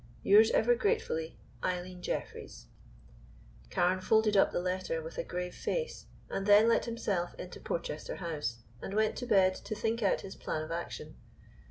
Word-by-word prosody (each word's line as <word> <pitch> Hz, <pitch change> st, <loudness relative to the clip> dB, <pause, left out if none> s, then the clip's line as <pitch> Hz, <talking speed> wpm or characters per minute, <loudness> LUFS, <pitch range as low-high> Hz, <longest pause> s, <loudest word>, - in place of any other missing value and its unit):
"Yours 215 Hz, +3 st, +7 dB
ever 240 Hz, +2 st, +4 dB
gratefully, 240 Hz, -, -1 dB, 0.2 s
"EILEEN 180 Hz, 0 st, -3 dB
JEFFREYS." -, -, -5 dB, 1.0 s
Carne 180 Hz, -, +1 dB
folded 220 Hz, +1 st, +3 dB
up 195 Hz, -, +5 dB
the -, -, -1 dB
letter 180 Hz, -2 st, -2 dB
with 160 Hz, +1 st, -7 dB
a -, -, 0 dB
grave 180 Hz, 0 st, -4 dB
face, 485 Hz, -1 st, -3 dB, 0.2 s
and 195 Hz, +1 st, -3 dB
then 205 Hz, +2 st, +7 dB
let 230 Hz, -, +3 dB
himself 200 Hz, -6 st, -2 dB
into 180 Hz, -, -8 dB
Porchester 155 Hz, -2 st, -4 dB
House 145 Hz, -, -4 dB, 0.2 s
and 195 Hz, -, -5 dB
went 215 Hz, 0 st, +2 dB
to 245 Hz, -, -4 dB
bed 190 Hz, -4 st, +5 dB
to 215 Hz, -, -6 dB
think 225 Hz, +2 st, -1 dB
out 200 Hz, -, +2 dB
his 190 Hz, -, -8 dB
plan 155 Hz, -, -3 dB
of 155 Hz, -, -8 dB
action. 170 Hz, +1 st, -5 dB
185 Hz, 165 wpm, -31 LUFS, 175-220 Hz, 1.0 s, Yours